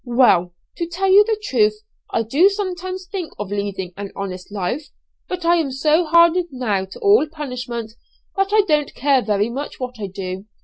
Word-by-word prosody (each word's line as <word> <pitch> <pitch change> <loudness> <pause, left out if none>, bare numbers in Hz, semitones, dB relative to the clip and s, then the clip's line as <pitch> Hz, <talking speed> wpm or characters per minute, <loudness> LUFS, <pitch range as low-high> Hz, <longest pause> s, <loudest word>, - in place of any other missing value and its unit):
"Well, 235 -9 +3 0.2
to 340 - -2
tell 380 +3 0
you 405 +2 +8
the 440 -1 -1
truth, 215 - +2 0.4
I 230 - +1
do 290 - +4
sometimes 370 -2 -4
think 370 -5 -4
of 205 -1 -5
leading 200 -3 -3
an 200 0 -6
honest 185 -1 -6
life. 210 - -3 0.4
But 360 -2 -4
I 345 +1 +5
am 305 -5 -1
so 305 +6 +2
hardened 340 +2 +4
now 215 -7 -1
to 190 - -12
all 405 -5 +5
punishment 250 -7 -5 0.4
that 390 0 0
I 430 0 +6
don't 300 -3 +1
care 275 -1 +3
very 210 0 0
much 280 +4 -6
what 250 -1 -5
I 205 - -3
do. 190 +1 -6
265 Hz, 185 wpm, -20 LUFS, -, 0.4 s, you